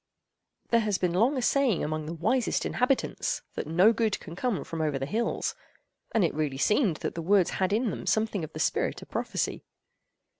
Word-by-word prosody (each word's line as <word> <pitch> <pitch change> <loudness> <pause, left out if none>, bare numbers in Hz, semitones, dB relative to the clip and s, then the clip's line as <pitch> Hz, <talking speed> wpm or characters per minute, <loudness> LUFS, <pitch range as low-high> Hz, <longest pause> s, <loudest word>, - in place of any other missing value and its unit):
There 235 - +4
has 210 -4 0
been 180 -2 0
long 235 +10 +3
a 255 - -1
saying 270 -9 +2
among 155 0 -3
the 165 - -4
wisest 225 +9 0
inhabitants, 255 +1 0
that - - -4
"no 180 +8 +5
good 220 -3 0
can 165 - -9
come 205 - -1
from 165 -1 -5
over 150 -3 0
the 135 - -2
hills"; 225 +10 -1 0.6
and 225 - +2
it - - -1
really 150 -3 -2
seemed 210 - +2
that - - -1
the 165 - -4
words 185 +1 +3
had 185 +1 +2
in 220 +1 +1
them - - -6
something 220 -4 +1
of 155 - -7
the - - -6
spirit - - 0
of - - -17
prophecy. - - -2
200 Hz, 200 wpm, -28 LUFS, 165-230 Hz, 0.6 s, no